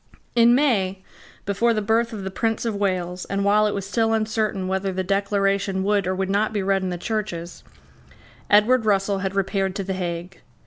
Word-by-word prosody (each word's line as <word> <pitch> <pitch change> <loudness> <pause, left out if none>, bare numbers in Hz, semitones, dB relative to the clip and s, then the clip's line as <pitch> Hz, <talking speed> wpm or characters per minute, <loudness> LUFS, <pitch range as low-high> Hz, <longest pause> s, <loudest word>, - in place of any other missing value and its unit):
In 235 0 +6
May, 195 -9 +1 0.4
before 225 +4 +1
the - - +1
birth 230 +3 +1
of 210 -3 -6
the 190 - -4
Prince 225 +3 -1
of 230 - 0
Wales, 185 -3 -2
and 200 0 -2
while 210 +1 +4
it 210 - -2
was 200 -1 -3
still 225 +3 +1
uncertain 215 -3 -1
whether 190 +1 -1
the 185 0 -2
Declaration 195 0 0
would 200 -2 +1
or 185 - 0
would 190 0 -1
not 205 +3 0
be 205 -2 -1
read 195 0 +1
in 185 - -2
the 175 - -3
churches, 175 -4 -4 0.9
Edward 225 +4 +4
Russell 200 -2 +1
had 190 0 -3
repaired 195 -1 0
to 195 - -2
the 190 0 -3
Hague. 175 0 -5
200 Hz, 195 wpm, -23 LUFS, 190-215 Hz, 0.9 s, In